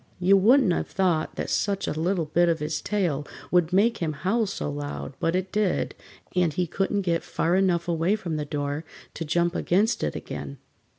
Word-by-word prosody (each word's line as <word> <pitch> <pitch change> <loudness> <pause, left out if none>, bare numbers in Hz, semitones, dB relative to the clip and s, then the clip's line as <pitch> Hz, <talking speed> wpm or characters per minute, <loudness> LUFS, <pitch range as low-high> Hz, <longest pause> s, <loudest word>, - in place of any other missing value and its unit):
You 185 +2 +5
wouldn't 220 +1 +5
have - - -2
thought 175 -5 0
that - - -3
such 200 -1 0
a - - 0
little 170 +2 0
bit 170 +3 +2
of 165 - +2
his 150 0 -3
tail 175 -9 0 0.3
would 175 -2 +3
make 220 +5 +3
him 160 -3 -1
howl 200 +9 0
so 190 - -4
loud, 145 -1 -5
but 165 +2 +1
it 185 0 -2
did, 210 -3 0 0.4
and 180 -3 +3
he 180 +4 0
couldn't 195 +4 -1
get 170 -3 0
far 170 +2 0
enough 180 -3 +2
away 170 +4 +1
from 175 -7 -4
the 150 - -2
door 145 0 -3 0.3
to - - -4
jump 170 +2 +1
against 200 +6 +1
it 75 - -1
again. 70 -1 -6
175 Hz, 195 wpm, -26 LUFS, 155-195 Hz, 0.4 s, You